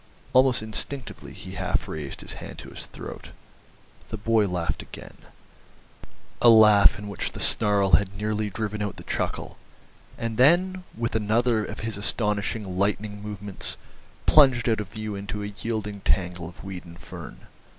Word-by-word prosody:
Almost 130 Hz, -3 st, +5 dB
instinctively 115 Hz, +4 st, -4 dB
he 95 Hz, -, -9 dB
half 95 Hz, -1 st, -1 dB
raised 75 Hz, -3 st, -5 dB
his -, -, -7 dB
hand -, -, -8 dB
to -, -, -9 dB
his -, -, -8 dB
throat. -, -, -9 dB, 0.8 s
They 110 Hz, -, -4 dB
boy 110 Hz, 0 st, +3 dB
laughed 90 Hz, -3 st, -2 dB
again, -, -, -11 dB, 1.3 s
a 120 Hz, -, +8 dB
laugh 105 Hz, -2 st, +7 dB
in 105 Hz, 0 st, -7 dB
which 100 Hz, -3 st, -3 dB
the -, -, -7 dB
snarl 100 Hz, -2 st, +2 dB
had 100 Hz, 0 st, +4 dB
nearly 105 Hz, 0 st, -1 dB
driven 105 Hz, +1 st, -3 dB
out 105 Hz, -2 st, -2 dB
the -, -, -10 dB
chuckle, -, -, -3 dB, 0.6 s
and 115 Hz, -1 st, -3 dB
then, 180 Hz, +7 st, +4 dB
with 115 Hz, 0 st, -2 dB
another 110 Hz, +1 st, +2 dB
of -, -, -6 dB
his 110 Hz, -1 st, -3 dB
astonishing 100 Hz, -2 st, -1 dB
lightning 105 Hz, +1 st, 0 dB
movements, 105 Hz, -2 st, -6 dB, 0.5 s
plunged 130 Hz, -6 st, +6 dB
out 110 Hz, -2 st, +2 dB
of 105 Hz, -, -6 dB
view 110 Hz, -1 st, -5 dB
into 100 Hz, +1 st, -4 dB
a 105 Hz, 0 st, -5 dB
yielding 105 Hz, -3 st, -3 dB
tangle 90 Hz, -3 st, 0 dB
of 85 Hz, -, -14 dB
weed 95 Hz, -2 st, -6 dB
and 85 Hz, -1 st, -12 dB
fern. -, -, -10 dB
105 Hz, 160 wpm, -26 LUFS, 100-115 Hz, 1.3 s, a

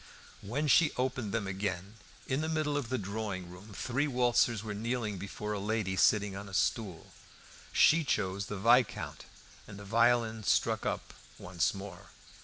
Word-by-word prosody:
When 130 Hz, +9 st, -2 dB
she 150 Hz, +3 st, +5 dB
opened 125 Hz, -4 st, -1 dB
them 115 Hz, -2 st, -1 dB
again, 95 Hz, +1 st, -4 dB, 0.3 s
in 135 Hz, +3 st, -1 dB
the 160 Hz, -, -2 dB
middle 155 Hz, -2 st, 0 dB
of 140 Hz, -5 st, -2 dB
the 130 Hz, -, 0 dB
drawing 100 Hz, -3 st, -4 dB
room 95 Hz, +4 st, -12 dB
three 130 Hz, +8 st, -1 dB
waltzers 120 Hz, -4 st, +2 dB
were 110 Hz, -2 st, -4 dB
kneeling 110 Hz, -2 st, -2 dB
before 105 Hz, +2 st, -5 dB
a 105 Hz, -, -3 dB
lady 105 Hz, -2 st, -1 dB
sitting 100 Hz, 0 st, +3 dB
on 100 Hz, 0 st, -7 dB
a 95 Hz, -, -6 dB
stool. 100 Hz, -4 st, -1 dB, 0.6 s
She 165 Hz, +1 st, +5 dB
chose 100 Hz, -7 st, -1 dB
the 105 Hz, -, -5 dB
Viscount, 120 Hz, +4 st, +2 dB, 0.4 s
and 100 Hz, -, -10 dB
the 100 Hz, -, -10 dB
violin 115 Hz, +1 st, +2 dB
struck -, -, +1 dB
up -, -, -3 dB, 0.2 s
once 90 Hz, +1 st, -1 dB
more. 100 Hz, +1 st, -9 dB
105 Hz, 165 wpm, -31 LUFS, 100-120 Hz, 0.6 s, she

